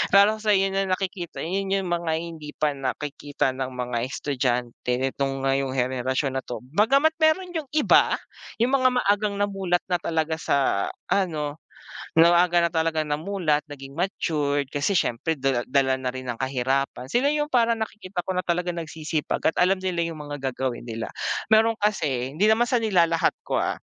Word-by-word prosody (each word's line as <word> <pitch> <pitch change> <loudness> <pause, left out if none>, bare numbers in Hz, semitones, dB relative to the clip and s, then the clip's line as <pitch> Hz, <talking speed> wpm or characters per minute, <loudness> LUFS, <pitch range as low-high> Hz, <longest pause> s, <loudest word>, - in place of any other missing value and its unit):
Lalo 205 +2 +6
sayo 200 -3 +3
na 195 0 0
nakikita, 185 -2 -3
'yon 195 +4 -2
yung 195 -2 0
mga 170 -2 0
hindi 160 -3 -7
pa 150 -1 +1
nakikita 140 +1 -2
ng 130 0 -3
mga 125 -1 -3
estudyante 125 -4 -2
nitong 135 0 -1
ngayong 135 0 +1
henerasyon 130 +1 0
na 130 - -3
'to. 120 - -6
Bagama't 225 - +3
mayro'n 330 +4 +2
yung 300 - -8
iba 305 - +5 0.5
yung 245 +2 +3
mga 255 -1 +4
maagang 205 0 +1
namulat 195 -3 0
na 180 - +2
talaga 160 -1 -1
sa 135 -11 +1 0.2
ano, 155 -6 0 0.6
maaga 175 +1 +5
na 170 - -1
talagang 160 -1 0
namulat, 155 -1 0
naging 135 -1 -9
matured, 150 -6 -1
kasi 145 +7 0
siyempre 140 +6 -1
dala 130 -2 +1
dala 130 0 +3
na 130 -1 -3
rin 130 0 -7
ng 120 -2 -4
kahirapan, 130 0 -1
sila 255 - +2
yung 300 0 0
parang 235 -2 +3
nakikita 205 -4 -5
ko 190 - -2
na 180 - 0
talagang 175 0 -1
nagsisipag 155 -1 -3
at - - +1
alam 185 +1 +3
nila 185 -2 -1
yung 160 - -9
mga 140 -2 -3
gagawin 125 -1 -3
nila. 115 -1 -5 0.5
Mayro'n 225 +1 +4
kasi 140 -11 0
hindi 205 +6 +3
naman 230 +2 +3
sa 245 -1 +1
nilalahat 170 -6 +3
ko, - - 0
ah. - - -1
160 Hz, 170 wpm, -25 LUFS, 135-195 Hz, 0.6 s, Lalo